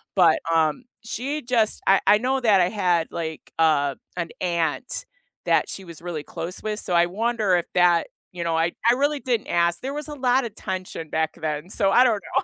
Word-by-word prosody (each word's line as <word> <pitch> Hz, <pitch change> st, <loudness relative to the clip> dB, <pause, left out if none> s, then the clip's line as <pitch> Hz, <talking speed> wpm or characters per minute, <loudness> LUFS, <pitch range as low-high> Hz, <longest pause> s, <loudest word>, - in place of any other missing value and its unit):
but, 175 Hz, -5 st, +5 dB
um, 160 Hz, +7 st, +2 dB, 0.2 s
she 275 Hz, +7 st, -3 dB
just 235 Hz, -4 st, 0 dB
I 195 Hz, 0 st, +5 dB
I 210 Hz, -, +7 dB
know 260 Hz, +3 st, 0 dB
that 215 Hz, -5 st, +4 dB
I 175 Hz, -, +3 dB
had, 180 Hz, -6 st, +1 dB
like, 160 Hz, -2 st, -6 dB
uh, 145 Hz, -4 st, +3 dB, 0.2 s
an 170 Hz, -2 st, -2 dB
aunt 170 Hz, -, -1 dB, 0.4 s
that -, -, +2 dB
she 195 Hz, -, -7 dB
was 170 Hz, -2 st, -11 dB
really 170 Hz, -4 st, -5 dB
close 170 Hz, +4 st, -6 dB
with, 215 Hz, -1 st, -2 dB
so 185 Hz, -, -4 dB
I 170 Hz, 0 st, +5 dB
wonder 215 Hz, 0 st, +1 dB
if 175 Hz, -, -2 dB
that 175 Hz, -2 st, +4 dB, 0.3 s
you 175 Hz, -1 st, -4 dB
know, 165 Hz, -1 st, 0 dB
I 165 Hz, +1 st, +1 dB, 0.2 s
I -, -, +6 dB
really 285 Hz, +2 st, +1 dB
didn't 240 Hz, -5 st, -1 dB
ask. 170 Hz, 0 st, +1 dB
There 270 Hz, +2 st, -4 dB
was 300 Hz, 0 st, -5 dB
a -, -, -5 dB
lotta 255 Hz, -2 st, +1 dB
tension 185 Hz, -6 st, -6 dB
back 160 Hz, 0 st, -1 dB
then, 155 Hz, +2 st, -3 dB
so 195 Hz, -1 st, +1 dB
I 245 Hz, -, +6 dB
don't 225 Hz, -5 st, +2 dB
know. -, -, +3 dB
185 Hz, 205 wpm, -24 LUFS, 165-235 Hz, 0.4 s, I